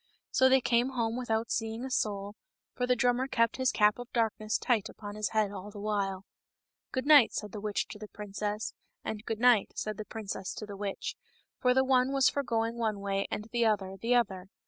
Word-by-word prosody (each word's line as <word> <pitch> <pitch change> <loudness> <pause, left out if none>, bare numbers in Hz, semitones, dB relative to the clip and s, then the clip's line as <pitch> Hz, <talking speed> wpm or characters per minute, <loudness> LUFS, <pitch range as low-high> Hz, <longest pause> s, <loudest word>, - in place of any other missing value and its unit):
So 260 0 +5
they 265 0 +5
came 245 +2 +2
home 230 -2 0
without 230 -2 -1
seeing 225 +2 -2
a 265 - -6
soul, 205 -4 -1 0.4
for 250 - -1
the 250 - +4
drummer 245 +2 +2
kept 230 -3 +1
his 260 -1 +2
cap 210 +2 +3
of 245 0 -8
darkness 220 -2 0
tight 220 -4 +1
upon 205 -1 -8
his 210 0 -2
head 215 -2 +1
all 200 0 -7
the 205 - -10
while. 200 -2 -2 0.3
" - - -61
Good 260 0 -2
night," 290 -5 +7
said 210 -2 -4
the 210 - -6
witch 210 -1 -1
to 210 - -9
the 215 - -7
princess, 210 +1 -4 0.3
and 215 -1 -4
" - - -42
Good 220 -1 -2
night 245 -4 +4
" - - -44
said 215 -1 -3
the 215 - -5
princess 200 -4 -5
to 215 - -6
the 205 -1 -8
witch, 200 0 -4 0.5
and 250 0 +4
the 265 - +5
one 260 0 +3
was 270 -2 +5
for 285 - -1
going 230 -2 -1
one 215 -3 0
way 195 0 -1
and 210 - -4
the 235 -1 +2
other 195 -3 0
the 230 +6 +1
other. 195 -6 0
220 Hz, 230 wpm, -30 LUFS, 205-245 Hz, 0.5 s, night